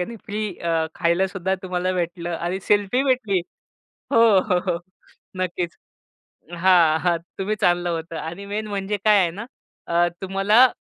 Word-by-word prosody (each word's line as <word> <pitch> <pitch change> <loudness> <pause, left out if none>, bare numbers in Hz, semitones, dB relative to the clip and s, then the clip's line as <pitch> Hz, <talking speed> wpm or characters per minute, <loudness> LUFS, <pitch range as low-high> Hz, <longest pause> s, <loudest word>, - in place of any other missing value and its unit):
आणि 230 +6 -4
फ्री 215 +1 -2
अ, 165 -1 0
खायलासुद्धा 190 +1 0
तुम्हाला 185 0 -1
भेटलं 175 -1 -3
आणि 175 +3 -3
सेल्फी 205 +5 +3
भेटली. 245 -8 +1 0.7
हो, 230 - +5 0.2
हो, 185 -2 +1
हो. 170 - -1 0.6
नक्कीच. 175 -1 -2 0.8
हां, 170 -3 +5
हां. 175 0 +2 0.2
तुम्ही 200 +2 -1
चाललं 175 0 +2
होतं 165 0 -4
आणि 170 +5 -6
मेन 210 +2 -3
म्हणजे 200 0 -2
काय 210 -1 +6
आहे 175 -2 +2
ना, 205 +7 -7 0.4
अ, 170 +1 +2
तुम्हाला 195 +6 +5
185 Hz, 145 wpm, -23 LUFS, 170-205 Hz, 0.8 s, काय